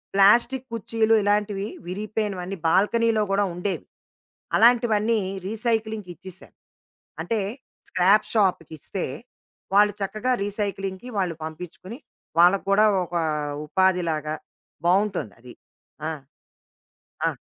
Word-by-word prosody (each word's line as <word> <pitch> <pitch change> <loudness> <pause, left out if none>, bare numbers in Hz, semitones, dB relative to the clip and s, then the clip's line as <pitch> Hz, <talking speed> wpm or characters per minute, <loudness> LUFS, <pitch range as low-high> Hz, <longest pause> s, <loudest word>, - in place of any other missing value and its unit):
Plastic 235 +6 +4
కుర్చీలు 225 0 +1
ఇలాంటివి 205 0 0 0.2
విరిగిపోయినవన్నీ 195 -1 -3
బాల్కనీలో 215 +4 +3
కూడా 200 +1 +2
ఉండేవి. 180 +3 -3 0.7
అలాంటివన్నీ 230 -2 +4 0.3
రీసైక్లింగ్‌కి 220 -3 -2
ఇచ్చిసా. 185 +2 -12 0.7
అంటే 225 -2 -1 0.5
స్క్రాప్ 205 +4 +4
షాప్‌కిస్తే, 185 -4 -1 0.7
వాళ్ళు 205 0 +5
చక్కగా 215 +6 -1
రీసైక్లింగ్‌కి 200 +1 -4
వాళ్ళు 180 -4 -1
పంపించుకుని 180 - -8 0.4
వాళ్ళకి 180 +3 +5
కూడా 215 +2 +5 0.2
ఒక 175 - -8 0.5
ఉపాధిలాగా 165 -3 +1 0.5
బావుంటొందది. 175 - 0 0.6
ఆ! - - -2 1.2
ఆ! - - +3
200 Hz, 85 wpm, -24 LUFS, 180-220 Hz, 1.2 s, వాళ్ళు